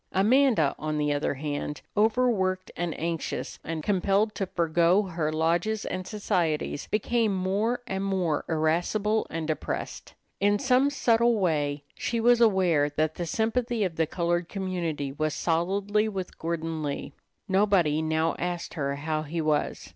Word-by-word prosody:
Amanda, 215 - +4
on 155 0 -2
the 150 -1 +1
other 145 0 -1
hand, 145 +1 -4
overworked 210 -4 +1
and 175 -2 -3
anxious, 165 0 -3
and 160 -1 -4
compelled 200 +3 +1
to 195 -2 -3
forego 170 +3 +2
her 165 -5 -2
lodges 170 +7 0
and 185 0 -4
societies, 170 -8 -1
became 220 -1 +1
more 205 +7 0
and 190 0 -3
more 185 -6 0
irascible 175 +7 +1
and 165 -1 -3
depressed. 155 -2 -4 0.2
In 205 +1 +3
some 260 +3 +3
subtle 235 -4 +3
way 145 -6 0
she 235 - -2
was 240 +1 +4
aware 180 -9 +4
that 155 +2 0
the 175 0 -4
sympathy 230 +2 0
of 180 -4 -2
the 160 -1 +1
colored 175 0 -1
community 175 -7 -3
was 155 +2 -2
solidly 200 +6 +1
with 190 -3 -6
Gordon 165 -1 -3
Lee. 140 -1 -4 0.3
Nobody 190 -6 +3
now 160 +1 +1
asked 175 -1 -3
her 140 -3 -2
how 155 +2 -2
he 155 +2 -4
was. 155 -2 0
175 Hz, 145 wpm, -27 LUFS, 155-205 Hz, 0.3 s, Amanda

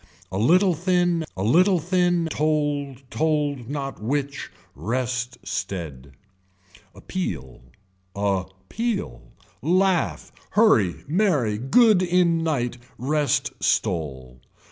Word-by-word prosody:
A 95 - -2
little 180 - +4
thin 175 -1 +1
a 95 - -2
little 180 - +4
thin 175 0 +1
told 145 -3 -1
told 145 -5 0
not 140 -5 -4
which. 140 +4 -2 0.2
Rest 120 - -3
stead. 70 -8 -5 0.8
Appeal, 65 - -5 0.5
a 100 -2 0 0.2
peal, 215 - -3 0.4
laugh, 185 +3 +1 0.3
hurry 110 - +4
merry, 145 - +1
good 210 - +4
in 175 -2 +2
night, 125 -6 -1 0.2
rest 145 +3 0
stole. 65 -7 -1
145 Hz, 95 wpm, -24 LUFS, 110-175 Hz, 0.8 s, little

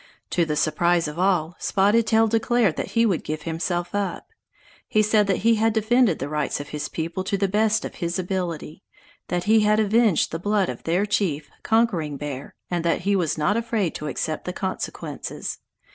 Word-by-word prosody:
To 170 - +2
the 150 -1 -2
surprise 170 +2 +2
of 150 +3 -6
all, 180 -3 +1
Spotted 205 +4 +2
Tail 225 0 +4
declared 225 -3 +2
that - - -4
he 230 0 +4
would 190 -7 0
give 155 0 -4
himself 175 +2 -2
up. 200 -3 -2 0.6
He 215 - +3
said 210 -1 +3
that 195 -1 0
he 230 -1 +5
had 225 +1 +2
defended 220 -3 +3
the - - -4
rights 150 -1 -2
of 145 - -7
his 150 -1 -4
people 170 +3 -3
to 200 +1 -1
the 195 0 +1
best 215 +2 +1
of - - -6
his 170 0 -3
ability, 180 -3 -3 0.5
that 175 -1 -1
he 220 +3 +4
had 210 0 +3
avenged 220 -2 +3
the 165 - -3
blood 205 +1 +1
of - - -7
their 175 +5 +1
chief, 185 -8 -1
Conquering 190 -11 +1
Bear, 140 -1 -6
and 175 -2 -2
that 170 -1 +1
he 200 +2 +1
was 170 -5 0
not 155 +7 +1
afraid 225 -6 -1
to 150 - -5
accept 155 +2 -3
the 180 - -3
consequences. 190 0 -5
185 Hz, 195 wpm, -24 LUFS, 165-215 Hz, 0.6 s, he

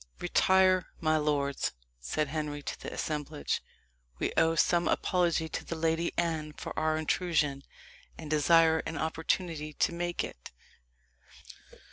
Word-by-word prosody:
"Retire, 185 -1 +3
my 155 -1 +2
lords," 145 -2 0 0.3
said 100 - -2
Henry 150 -1 -3
to - - -5
the - - -6
assemblage; 150 -1 -2 0.6
"we - - -1
owe 165 0 +3
some 170 +1 +3
apology 170 -3 +1
to - - -4
the 165 - -5
Lady 165 +1 0
Anne 160 -3 -1
for - - -7
our 155 0 +1
intrusion, 155 -3 0 0.6
and 160 - -8
desire 160 +2 +4
an 160 - -4
opportunity 160 -1 -2
to 170 - +1
make 175 0 -2
it." - - -8
160 Hz, 130 wpm, -30 LUFS, 150-170 Hz, 0.6 s, desire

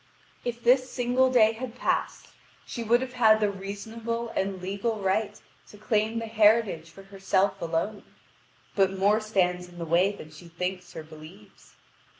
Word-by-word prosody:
If 240 -1 -4
this 255 +2 +4
single 250 +1 +2
day 220 -4 +5
had 235 +1 -7
passed, - - -2 0.4
she 235 - -6
would 235 +2 +3
have 260 -1 -5
had 220 -3 +5
the 210 -1 +1
reasonable 225 +4 -5
and 195 -3 -2
legal 200 +4 -3
right 200 +2 -1 0.3
to 210 - -14
claim 215 +1 0
the 230 - -3
heritage 215 -6 +3
for 195 +4 -14
herself 195 0 0
alone. 170 +5 -2 0.7
But 195 -1 +2
more 205 +3 +3
stands 180 -5 0
in 175 - -15
the 170 - -4
way 175 +5 +3
than 155 -6 -11
she 155 +3 -13
thinks 180 +2 -5
or 160 - -6
believes. 155 -8 -15
205 Hz, 160 wpm, -27 LUFS, 185-230 Hz, 0.7 s, day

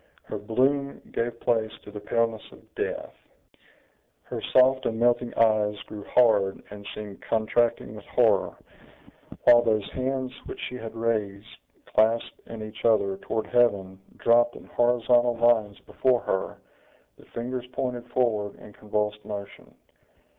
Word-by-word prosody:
Her - - -6
bloom 135 +6 0
gave 115 0 -2
place 110 -2 +1
to 105 - -11
the 105 - -7
paleness 115 +1 0
of - - -19
death; - - -4 1.1
her - - -6
soft 130 +1 +4
and 110 0 -2
melting 120 0 +2
eyes 110 -2 +3
grew 105 -1 -9
hard, 105 -6 +3
and 100 0 -9
seemed 105 -2 -8
contracting 115 +1 0
with - - -11
horror; - - +2 0.9
while 120 0 +7
those 110 -3 +1
hands, 130 0 -2
which - - -7
she - - -5
had 115 -2 -7
raised, 110 -3 -2 0.3
clasped 110 +2 +1
in 115 -1 -7
each 110 0 -9
other, 100 -4 +2
toward 110 +2 -3
heaven, 100 -6 +1 0.2
dropped 120 +1 +3
in - - -12
horizontal 120 0 +2
lines 115 -4 +3
before 125 -2 +1
her, 95 - -2 0.6
the - - -17
fingers 125 +1 -5
pointed 125 -1 -4
forward 110 -5 0
in 105 - -14
convulsed 105 0 -2
motion. 100 -1 -8
115 Hz, 140 wpm, -26 LUFS, 105-120 Hz, 1.1 s, while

